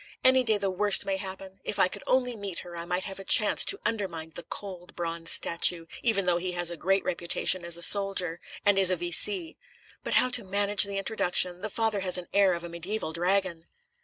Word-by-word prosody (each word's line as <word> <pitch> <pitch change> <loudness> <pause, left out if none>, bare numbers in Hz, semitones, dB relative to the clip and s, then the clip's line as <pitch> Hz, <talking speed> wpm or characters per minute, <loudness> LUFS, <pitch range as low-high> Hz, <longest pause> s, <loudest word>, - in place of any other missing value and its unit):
Any 260 0 +4
day 220 -3 +1
the 200 -1 -2
worst 205 +2 +3
may 195 -1 -2
happen. 190 0 -9
If 205 - -3
I 190 - +4
could - - -8
only 250 -2 +1
meet 200 -4 -5
her, 175 -1 -10
I 170 0 -6
might 180 +1 -2
have 195 -1 -8
a - - -8
chance 210 +2 +5
to 400 - +2
undermine 185 -8 -3
the - - -8
cold, 185 -3 -8
bronze 165 -1 -4
statue, 170 0 +3 0.2
even 215 -5 0
though 175 -1 +2
he 180 0 -4
has 175 -1 -1
a - - -5
great 195 +4 0
reputation 175 +1 -1
as 170 0 -2
a 170 - -2
soldier, 195 -4 +1 0.3
and 205 -1 +4
is 190 -1 +4
a 185 - +1
V.C. 325 - +2 0.5
But - - -2
how 255 - +4
to 245 -2 +1
manage 200 +1 +1
an 200 - -8
introduction? 180 -3 -1
The 215 - -4
father 220 -1 -1
has 185 -1 -2
the 180 - +1
air 195 -3 +3
of 170 - -8
a 170 - -7
mediaeval 170 +1 -4
dragon." 175 -1 -1
190 Hz, 220 wpm, -27 LUFS, 175-205 Hz, 0.5 s, chance